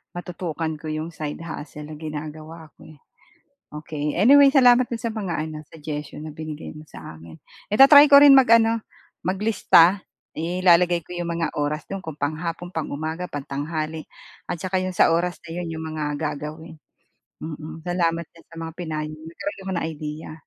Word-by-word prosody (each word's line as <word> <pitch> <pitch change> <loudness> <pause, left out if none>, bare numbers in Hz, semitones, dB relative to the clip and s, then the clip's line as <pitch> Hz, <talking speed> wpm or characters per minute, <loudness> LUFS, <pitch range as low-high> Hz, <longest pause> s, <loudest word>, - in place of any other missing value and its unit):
matutukan 165 -3 -4
ko 155 - -8
yung 155 +2 -4
side 155 0 -6
hustle 150 -2 -8
na 150 - -9
ginagawa 155 +1 -8
ko - - -14
eh. 155 - -15 0.7
Okey. 150 0 -4
Anyway, 275 +7 +7
salamat 250 -2 +6
dun 235 - -3
sa 225 -1 -4
mga 195 -6 -3
ano, 155 -1 -7
suggestion 150 -1 -7
na 155 - -8
binigay 155 0 -7
mo 155 - -10
sa - - -10
akin. 80 0 -13 0.3
I-ta-try 280 +6 +8
ko 280 - +10
rin 285 -1 +9
mag-ano, 230 -3 +5 0.4
mag-lista. 190 -2 +3 0.3
Ilalagay 175 0 +2
ko 180 - -8
yung 175 -1 -3
mga 165 - -2
oras 150 +2 -2
do'n 195 -1 -6
kung 160 -4 -8
panghapon, 165 +4 -4
pang-umaga, 160 +3 -4
pangtanghali 155 +3 -4 0.5
at - - -3
tsaka 185 +1 -1
yung 185 0 -3
sa - - +5
oras 175 +1 -1
na - - -10
'yon 175 -1 -4
yung 160 - -6
mga 150 -1 -3
gagawin, 155 +2 -6 0.6
mm. 155 0 -8
Salamat 170 -1 0
diyan 165 - -20
sa - - -13
mga 165 - -6
pinayo 155 -3 -4
mo. 155 - -15
Nagkaroon 295 - -6
ako - - -2
ng - - -3
idea. 155 0 -7
165 Hz, 170 wpm, -23 LUFS, 155-180 Hz, 0.7 s, ko